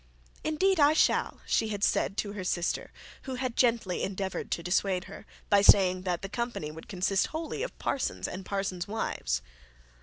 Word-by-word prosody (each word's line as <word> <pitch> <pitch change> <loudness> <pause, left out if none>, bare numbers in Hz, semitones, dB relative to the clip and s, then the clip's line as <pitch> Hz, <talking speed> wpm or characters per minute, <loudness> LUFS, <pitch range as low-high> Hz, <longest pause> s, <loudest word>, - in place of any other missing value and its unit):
'Indeed, 355 +4 +2
I 290 +1 +6
shall,' - - +2
she 220 - +1
said 200 0 +1
to 200 0 -2
her 200 -3 -5
sister 175 -1 -1 0.3
who 260 - -4
had 250 -2 -3
greatly 230 -7 +2
endeavoured 190 0 -3
to 170 - -2
dissuade 185 +1 +1
her, - - -11 0.2
by 205 -1 +5
saying 185 -2 +6
that 175 0 -1
the - - -2
company 235 -8 -3
would 160 +1 -11
consist 190 +1 +1
wholly 320 +5 -4
of - - -4
parsons 275 - -2
and 185 +1 -6
parsons' 190 -3 -3
wives. 60 - -2
200 Hz, 170 wpm, -29 LUFS, 185-245 Hz, 0.3 s, I